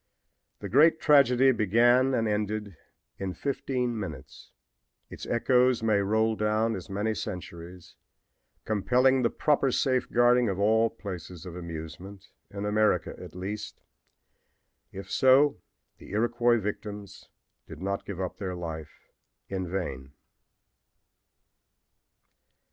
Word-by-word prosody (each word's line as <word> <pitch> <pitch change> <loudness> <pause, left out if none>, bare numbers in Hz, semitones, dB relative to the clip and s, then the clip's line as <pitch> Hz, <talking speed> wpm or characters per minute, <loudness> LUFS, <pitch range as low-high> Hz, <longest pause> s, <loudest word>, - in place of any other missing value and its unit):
The 100 - -4
great 155 - +5
tragedy 135 -3 +5
began 120 +4 +3
and 115 -2 0
ended 105 -2 -2 0.4
in 95 -1 -4
fifteen 125 -4 -2
minutes. 80 -10 -8 0.6
Its - - -8
echoes 125 0 +2
may 110 -2 +3
roll 110 +3 +1
down 110 +1 0
as 90 -3 -8
many 105 +3 -1
centuries, 90 -2 -8 0.7
compelling 125 +5 +2
the 120 - +2
proper 140 -3 +1
safeguarding 125 -2 +2
of 95 - -2
all 110 +3 +3
places 90 -6 -8
of 90 -2 -8
amusement, 90 +3 -8 0.2
in 100 0 -6
America 105 +1 +1
at - - -11
least. 100 +4 -6 1.1
If 95 +1 -9
so, 135 +2 +4 0.4
the - - -13
Iroquois 120 +2 +2
victims 105 -1 -6 0.4
did 80 - -10
not 100 +2 -3
give 100 -3 -7
up 95 -2 -4
their 95 -3 -4
lives 80 -3 -6 0.6
in 95 -2 -3
vain. 70 -8 -5
105 Hz, 115 wpm, -27 LUFS, 95-120 Hz, 1.1 s, great